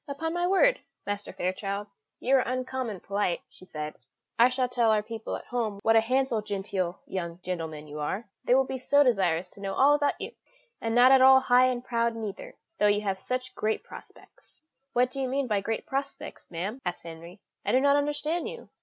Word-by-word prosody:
"Upon 320 +4 -3
my 350 0 0
word, - - +4 0.3
Master 205 0 -4
Fairchild, 195 +2 -3 0.3
you 265 +2 +3
are - - +6
uncommon 255 -5 -3
polite," 200 -3 -1
she - - -17
said; 150 -3 -5 0.5
"I 240 +2 +7
shall 255 0 0
tell 240 -2 +2
our 215 -1 +3
people 225 0 -5
at - - -8
home 230 -5 -2
what 225 0 +4
a 225 - +7
handsome 255 -1 0
genteel 195 -3 -3
young 170 -3 -4
gentleman 160 -4 -4
you 150 0 -8
are. 190 +9 -3 0.2
They 250 - +4
will 265 - +5
be 260 0 -4
so 285 +3 +4
desirous 185 - +1
to 200 - -14
know 195 -1 -3
all 280 +2 +5
about 290 -1 +1
you - - -5 0.5
and 225 0 -1
not 250 +2 +7
at 265 -1 +7
all 265 0 +8
high 250 0 +5
and 250 -1 -2
proud 235 -2 0
neither, 225 - -6 0.2
though 210 - +5
you 205 0 +3
have 195 -2 -2
such 255 +3 -3
great 215 +1 -1
prospects." - - -15 0.3
"What 250 +1 +2
do 275 - -3
you 260 - 0
mean 275 +1 0
by 210 -4 0
great 225 +2 -3
prospects, 275 +1 -5
ma'am?" 190 +9 -4
asked 175 0 -4
Henry; 170 +3 -10 0.2
"I - - 0
do 255 - +5
not 280 +1 +4
understand 295 +3 0
you." 480 - -10
230 Hz, 205 wpm, -28 LUFS, 195-265 Hz, 0.5 s, all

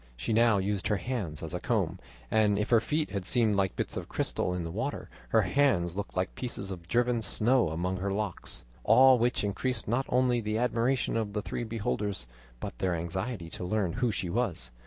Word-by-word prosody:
She 65 - -2
now 115 -1 +5
used 100 0 -1
her 105 -1 +1
hands 100 - -4
as 80 +1 -5
a 90 - -2
comb, - - 0 0.3
and 105 -2 +3
if 105 +3 -1
her 115 - +7
feet 150 +6 -1
had 100 -2 -2
seemed 110 +1 +3
like 95 -2 +1
bits - - -3
of - - -5
crystal - - -1
in 90 -1 -2
the 85 - -5
water, 115 +10 -4 0.2
her 110 -1 +4
hands 95 -6 +2
looked 100 -1 -5
like 90 +1 0
pieces 100 -6 -5
of 85 -3 -8
driven 120 +1 +2
snow 115 +2 +2
among 90 +4 -2
her 100 +2 -2
locks; 100 -2 -4 0.2
all 130 -1 +7
which 120 -1 +1
increased 115 +4 -2
not 120 +5 0
only 125 -1 +2
the 105 0 -1
admiration 120 +2 +1
of 110 -3 -1
the 105 -1 -2
three - - -3
beholders, 105 - -2 0.3
but - - -6
their 90 -2 +1
anxiety 90 +3 -3
to - - -5
learn 95 -1 0
who 125 -1 +1
she 100 -3 -2
was. 85 - -1
105 Hz, 205 wpm, -29 LUFS, 90-120 Hz, 0.3 s, her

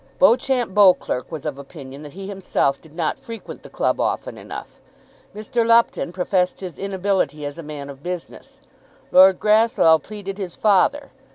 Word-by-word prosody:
Beauchamp 255 -4 +3
Beauclerk 185 -10 +3
was 160 -3 -7
of 145 -2 -4
opinion 140 -1 -10
that 150 -2 -11
he 195 +1 -8
himself 190 -8 -1
did 160 -1 -18
not 165 -3 -2
frequent 230 -1 -9
the - - -13
club - - -1
often - - -2
enough. - - -10 0.5
Mr. 215 +3 -1
Lupton 230 -6 +3
professed 180 0 0
his 185 -3 -8
inability 190 -6 -1
as 145 +3 -6
a - - -4
man 150 -2 -8
of 140 -1 -11
business. 180 +1 -7 0.5
Lord 185 0 +7
Grasslough 215 -6 +4
pleaded 200 +2 -8
his 185 -3 -5
father. 215 +8 +2
185 Hz, 160 wpm, -21 LUFS, 155-210 Hz, 0.5 s, Lord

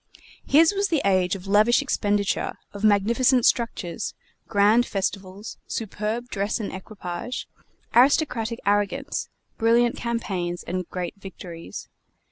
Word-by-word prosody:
His 320 +6 +6
was 400 0 +1
the 320 -6 0
age 185 -1 +2
of 190 -1 -9
lavish 210 +4 +4
expenditure, 205 -7 0 0.2
of 200 +1 -8
magnificent 230 +5 +4
structures, 225 -6 0 0.3
grand 215 +2 +4
festivals, 195 0 -4
superb 220 +2 -3
dress 200 0 -1
and 210 - -4
equipage, 190 +3 -6 0.5
aristocratic 245 -3 +3
arrogance, 205 +8 0 0.3
brilliant 235 +1 +3
campaigns, 190 -7 -3
and 185 0 -4
great 180 0 -4
victories. 175 -3 -9
210 Hz, 110 wpm, -24 LUFS, 195-240 Hz, 0.5 s, His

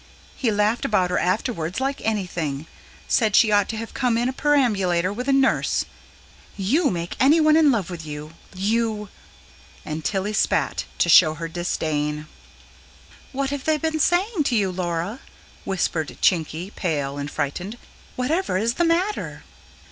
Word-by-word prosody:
He 250 - 0
laughed 210 +2 +1
about 185 -4 +1
her 180 - +1
afterwards 185 -2 -1
like 270 +1 -2
anything; 170 -9 -2 0.4
said 220 -4 +2
she 225 -3 +5
ought 205 -1 +3
to 225 - -3
have 230 +1 -6
come 245 -3 +1
in 240 +1 +1
a 260 - -2
perambulator, 200 - +2
with 250 +5 -5
a - - +3
nurse. 270 0 +2 0.7
YOU 275 - +2
make 170 -1 -4
anyone 310 +4 +5
in 315 -2 +5
love 200 -7 -1
with 170 -2 -6
you 150 0 -7 0.2
you!" 210 +1 -1 0.8
And 155 +1 -5
Tilly 200 +3 -1
spat, - - 0
to - - +2
show 160 -2 +7
her 165 +2 -5
disdain. 155 -3 -2 1.1
"What 275 0 -2
have 285 -2 -4
they 315 -1 +2
been 315 +1 -1
saying 360 +5 +2
to 245 - +1
you, 200 -4 +1
Laura?" 175 +5 -3 0.5
whispered 165 -5 -2
Chinky, 170 +1 0
pale 145 -5 -2
and 145 0 -4
frightened. 165 +10 -4 0.4
"Whatever 285 - 0
is 225 +4 +1
the 345 - 0
matter?" 360 +5 -1
205 Hz, 155 wpm, -23 LUFS, 170-260 Hz, 1.1 s, show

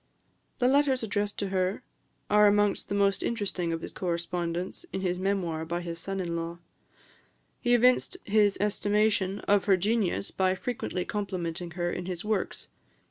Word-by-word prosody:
The 245 - +3
letters 270 -2 +3
addressed 205 -1 -1
to 200 - -2
her 185 0 0 0.4
are 210 0 +6
amongst 205 0 +2
the 200 - -1
most 200 -1 +2
interesting 195 -7 -1
of 165 0 -2
his - - -6
correspondence 175 - -3
in 190 - -3
his 180 -1 -1
Memoir 185 -5 -1
by 170 +2 -3
his 170 -1 -5
son 195 +3 -3
in 170 -2 -2
law. 170 0 -4 1.0
He 245 -1 +3
evinced 250 +9 +3
his 205 -1 +3
estimation 205 -1 +1
of 205 -1 +2
her 195 -2 +5
genius 200 0 0
by 185 0 +1
frequently 190 -4 -3
complimenting 180 -4 -3
her 175 0 0
in 180 0 -4
his 180 +1 -4
works. 215 -2 -2
195 Hz, 160 wpm, -28 LUFS, 175-210 Hz, 1.0 s, are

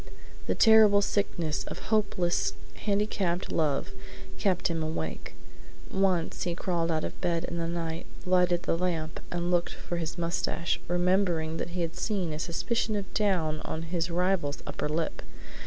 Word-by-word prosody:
The 95 - +1
terrible 215 -2 +7
sickness 170 -7 0
of - - -6 0.2
hopeless 175 - +2 0.2
handicapped 200 -4 0
love 145 - +1 0.5
kept 185 -2 +2
him 165 -1 -1
awake. 80 - -4 0.6
Once 190 -4 +1
he 175 -2 -1
crawled 170 -2 0
out 160 -1 +1
of - - -5
bed 170 -1 +1
in 170 - -4
the 165 - -1
night, 165 -1 -3 0.2
lighted 180 -1 +3
the - - +1
lamp, 165 -3 -1
and 175 0 -1
looked 175 -1 +1
for 175 - -4
his 165 +1 -3
mustache, 170 0 -1
remembering 175 -2 +2
that - - -3
he - - 0
had 165 -1 -2
seen 190 -7 -1
a 150 - -4
suspicion 215 +6 -1
of 200 -2 -4
down 175 -8 +1
on 160 - -4
his 170 +1 -1
rival's 175 -4 0
upper - - -3
lip. 160 +1 -1
175 Hz, 155 wpm, -29 LUFS, 165-185 Hz, 0.6 s, terrible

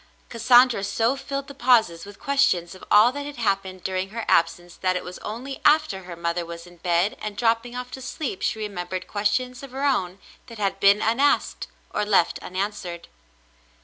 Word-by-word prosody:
Cassandra 240 -1 +5
so 225 +6 +1
filled 275 0 -5
the 280 - -9
pauses 225 -11 +3
with 205 -1 -12
questions 275 -12 +1
of 185 - -14
all 215 +4 +6
that 285 +2 -5
had 290 - -7
happened 195 -5 -2
during 190 0 -2
her 225 +2 -5
absence 170 +1 +1
that 185 -1 0
it 180 - -2
was 180 - -8
only 255 +6 -6
after 295 - +3
her 175 -1 -8
mother 170 +1 -2
was 170 0 -9
in 175 0 -16
bed 175 +3 +1
and 210 -1 -5
dropping 230 +1 +1
off 250 0 -6
to 265 - -8
sleep 260 -5 -5
she 220 - 0
remembered 185 -3 -4
ques 205 0 0
tions 250 +4 -2
of 275 - -9
her 270 +2 -2
own 190 -10 0 0.3
that 230 -2 -11
had 200 -2 -1
been 200 +1 +5
unasked, 265 +6 +1 0.3
or - - 0
left 205 -5 +2
unan 195 +3 -2
swered. 175 -4 -8
210 Hz, 195 wpm, -24 LUFS, 185-250 Hz, 0.3 s, all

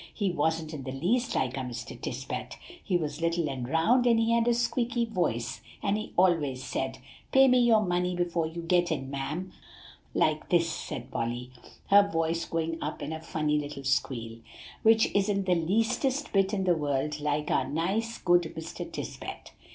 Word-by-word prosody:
He 200 -4 -1
wasn't 160 0 -1
in 150 - -5
the 130 0 -5
least 230 - 0
like 130 -1 0
our - - -3
Mr. 120 -2 -6
Tisbett; - - -5 0.3
he 180 - +1
was 150 -2 -4
little 170 -1 +1
and 130 -3 -4
round, 230 - +3
and 230 -1 +5
he 225 0 +2
had 235 0 +3
a 240 - +5
squeaky 240 0 0
voice; 120 - -2 0.2
and 200 0 +2
he 215 - -4
always 155 -8 +2
said, 135 - -3 0.3
'Pay 270 0 +7
me 255 -1 +5
your 235 -3 +5
money 180 -2 0
before 175 -2 0
you 170 +1 -6
get 175 0 +2
in, 135 -3 -3
ma'am,' 150 +7 -4 0.6
like 155 0 +1
this," 170 -1 +3
said 165 - -5
Polly, 120 +2 -3 0.4
her 200 +1 +9
voice 165 -1 0
going 165 0 -2
up 150 - -4
in 150 +2 -4
a 160 - -6
funny 155 -2 0
little 145 -1 -6
squeal, 120 -4 -1 0.4
"which 225 0 +5
isn't 200 -1 +1
the 180 - +3
leastest 230 - 0
bit 195 -1 +3
in 200 -3 0
the 180 -1 +4
world 145 0 -1
like 150 0 -1
our - - +1
nice, 195 +9 -1
good 175 -2 +3
Mr. 160 0 -6
Tisbett." - - -7
165 Hz, 180 wpm, -28 LUFS, 150-200 Hz, 0.6 s, her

